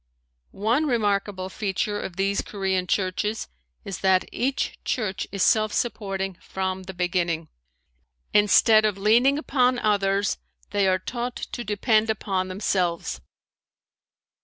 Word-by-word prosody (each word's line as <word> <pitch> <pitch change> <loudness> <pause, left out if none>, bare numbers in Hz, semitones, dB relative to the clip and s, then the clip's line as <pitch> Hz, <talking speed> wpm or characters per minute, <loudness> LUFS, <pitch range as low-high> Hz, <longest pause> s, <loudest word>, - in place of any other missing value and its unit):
One 235 +10 0
remarkable 205 -5 0
feature 205 +1 -2
of 175 - -6
these 195 +1 +1
Korean 190 -2 -2
churches 200 +4 -1 0.4
is 195 -2 -5
that 190 -1 +3
each 270 +2 -1
church 195 -6 -2
is 195 -1 0
self 215 -1 +3
supporting 195 -6 -2
from 190 0 -3
the - - -5
beginning. 175 -2 -1 0.8
Instead 215 +1 +6
of 210 -2 +1
leaning 235 +7 +4
upon 255 -4 +2
others 200 -3 +1 0.3
they 200 -1 +2
are 185 0 +3
taught 240 +6 -4
to 240 - -5
depend 215 +1 +2
upon 195 -4 -1
themselves. 185 -3 -1
200 Hz, 120 wpm, -25 LUFS, 190-220 Hz, 0.8 s, Instead